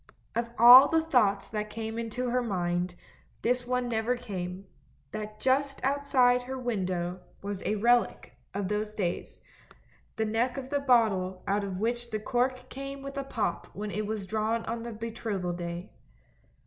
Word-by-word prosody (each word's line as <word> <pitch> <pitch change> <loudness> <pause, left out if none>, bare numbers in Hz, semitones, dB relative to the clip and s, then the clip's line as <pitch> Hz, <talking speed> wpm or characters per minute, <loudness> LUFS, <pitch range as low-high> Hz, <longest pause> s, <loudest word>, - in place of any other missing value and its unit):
Of 235 0 -1
all 245 +4 +11
the 325 +1 +2
thoughts 215 -10 +2
that 210 -1 -3
came 225 +1 -4
into 240 +2 -2
her 250 +1 +2
mind, 180 -4 -1 0.5
this 245 +1 +1
one 250 0 0
never 235 +1 0
came, 190 -5 -5 0.5
that 215 0 -6
just 275 +1 +1
outside 260 -3 +3
her 260 +2 -5
window 185 -7 -2 0.2
was 200 -1 -4
a 215 - +1
relic 240 +3 +2 0.2
of 200 -1 -2
those 210 +1 -2
days, 175 -4 -3 0.7
the 220 - 0
neck 230 +5 0
of 265 0 -6
the 285 - +2
bottle 215 -9 +2
out 200 +1 +1
of 195 -2 -4
which 235 +3 -1
the 215 -2 -2
cork 250 +3 -1
came 275 +1 -7
with 275 +1 -7
a 275 - -2
pop 230 -6 -2
when 210 +1 -4
it 210 0 -2
was 215 -2 -3
drawn 220 +3 -1
on 230 +1 -3
the 235 0 -5
betrothal 220 -5 -3
day. 175 0 -5
225 Hz, 165 wpm, -29 LUFS, 200-250 Hz, 0.7 s, all